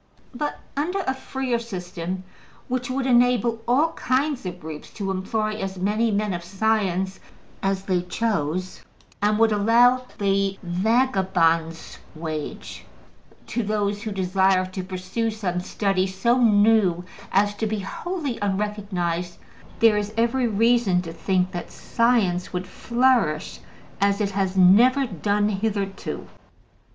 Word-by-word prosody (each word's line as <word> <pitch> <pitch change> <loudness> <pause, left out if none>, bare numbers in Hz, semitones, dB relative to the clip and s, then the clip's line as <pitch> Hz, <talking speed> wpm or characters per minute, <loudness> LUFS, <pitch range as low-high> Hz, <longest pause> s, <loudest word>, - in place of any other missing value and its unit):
But 295 +4 -3 0.2
under 350 +8 -1
a 265 - -1
freer 265 -2 -2
system, 185 -4 -5 0.4
which 250 -1 -2
would 260 +1 -1
enable 240 -2 +3
all 285 +7 +3
kinds 260 -3 -1
of 180 0 -6
groups 155 -2 -8
to 195 -3 -3
employ 215 +3 -1
as 195 -2 -4
many 210 +5 +1
men 210 -1 0
of 175 0 -4
science 195 -1 0 0.4
as 195 0 -1
they 185 -2 0
chose, 185 -3 -2 0.4
and 210 +1 +2
would 225 0 +4
allow 240 +4 +4
the 195 -1 +1
``vagabond's 180 -5 +1 0.2
wage'' 155 -2 -6 0.6
to 240 - -2
those 205 -1 -1
who 220 -1 -4
desired 190 -1 +1
to 185 - -4
pursue 185 +5 -3
some 200 -5 -2
study 190 +1 0
so 235 +7 +1
new 205 -5 +4 0.3
as 205 +1 +3
to 220 - -1
be 215 -1 -2
wholly 295 - -4
unrecognized, 190 -4 -2 0.4
there 225 -2 +6
is 210 +1 -3
every 235 +2 +2
reason 225 -4 +2
to 165 -2 -7
think 185 +2 0
that 175 -2 -6
science 225 -7 +1
would 180 0 -3
flourish 235 -7 +1 0.4
as 200 0 +2
it 200 -2 0
has 195 -1 -1
never 235 +9 +6
done 205 0 0
hitherto. 200 -1 -3
200 Hz, 130 wpm, -24 LUFS, 185-230 Hz, 0.6 s, there